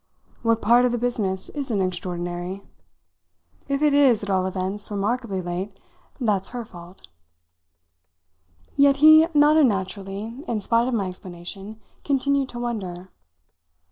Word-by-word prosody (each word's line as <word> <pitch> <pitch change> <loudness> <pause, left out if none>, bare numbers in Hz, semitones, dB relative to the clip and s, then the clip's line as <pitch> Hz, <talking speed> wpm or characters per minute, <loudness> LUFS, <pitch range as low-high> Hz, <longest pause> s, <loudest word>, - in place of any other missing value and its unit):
What 230 -1 +1
part 240 +3 +5
of 250 - +2
the 240 - -1
business 215 -6 -2
isn't 265 -8 -3
extraordinary? 180 0 -4 1.0
If 280 +1 -1
it 295 -1 +4
is, 265 -7 +4
at 200 - -3
all 185 -1 +1
events, 190 +2 -3
remarkably 205 0 -2
late, 185 +3 -5 0.4
that's 210 -6 0
her 240 -1 -6
fault." 175 - -14 1.7
Yet 280 0 +4
he 310 +2 +8
not 295 +1 +5
unnaturally, 205 0 -1
in 230 -2 -1
spite 230 +3 +1
of 255 - 0
my 200 -4 -1
explanation, 185 +4 -9 0.2
continued 280 -1 +1
to 240 - -8
wonder. 190 -7 -5
210 Hz, 130 wpm, -23 LUFS, 190-250 Hz, 1.7 s, he